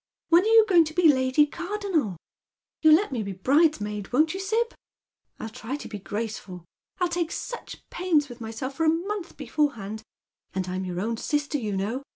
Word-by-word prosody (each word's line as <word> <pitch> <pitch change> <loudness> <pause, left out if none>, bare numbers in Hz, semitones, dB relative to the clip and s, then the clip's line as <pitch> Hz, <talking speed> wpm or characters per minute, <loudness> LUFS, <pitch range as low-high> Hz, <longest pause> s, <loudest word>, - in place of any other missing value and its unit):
"When 340 +1 +7
are 415 - -1
you 445 -1 +7
going 350 -4 +6
to 310 +1 -7
be 330 -4 +6
Lady 260 +3 +3
Cardonnel? 345 - -2 0.6
You'll 315 -1 +8
let 400 +2 0
me 245 -4 -2
be 200 -2 -4
bridesmaid, 210 - +1
won't 310 +6 +3
you, 380 - -4
Sib? 450 +5 0 0.7
Ill 225 - -5
try 225 +4 -5
to 290 - -7
be 210 - -7
graceful. 205 -4 -5 0.3
I'll 360 - +2
take 345 -1 -2
such 480 - -7
pains 330 -5 +1
with 245 -2 -11
myself 225 +4 -5
for 325 - +1
a 320 - +5
month 360 +3 -2
before 295 -2 0
hand, 215 +1 -6 0.5
and 185 -1 -1
I'm 185 +1 -3
your 180 -1 -4
own 225 +2 -2
sister, 295 +3 -1
you 210 -5 -2
know. 220 +7 -2
290 Hz, 195 wpm, -26 LUFS, 215-340 Hz, 0.7 s, You'll